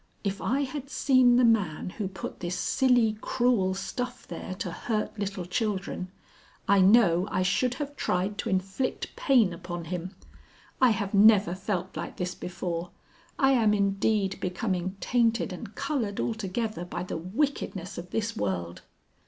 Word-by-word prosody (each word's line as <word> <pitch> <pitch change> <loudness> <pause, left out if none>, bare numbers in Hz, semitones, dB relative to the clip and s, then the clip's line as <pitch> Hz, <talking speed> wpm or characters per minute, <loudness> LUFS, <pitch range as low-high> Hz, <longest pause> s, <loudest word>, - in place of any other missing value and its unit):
"If 200 -1 -2
I 270 +4 +1
had 275 0 -4
seen 255 -4 +4
the 250 - +5
man 190 -8 +1
who 205 0 -3
put 190 -1 -7
this 175 +1 -3
silly 245 -5 +2
cruel 235 -7 +1
stuff 245 +6 -5
there 180 +2 -6
to 185 -2 -4
hurt 215 +3 -3
little 195 -3 -3
children, 190 -1 -2 0.6
I 200 -1 +5
know 190 -3 +5
I 185 - 0
should 240 +7 +1
have 290 0 -5
tried 195 -2 -1
to 230 - -2
inflict 195 +6 -2
pain 235 -10 +3
upon 175 0 -6
him. 180 +3 -5 0.7
I 255 - +7
have 205 -2 -1
never 205 -2 +6
felt 190 -1 -3
like - - -5
this 180 0 -2
before. 175 -1 -4 0.5
I 270 -4 +4
am 220 -5 +4
indeed 200 0 +1
becoming 185 0 -2
tainted 230 -5 +1
and 195 +3 -9
coloured 270 -8 -2
altogether 215 -2 -2
by 175 - -5
the 180 - -4
wickedness 190 - -2
of 175 +1 -9
this 225 +3 -2
world." 90 - -3
200 Hz, 155 wpm, -28 LUFS, 180-230 Hz, 0.7 s, I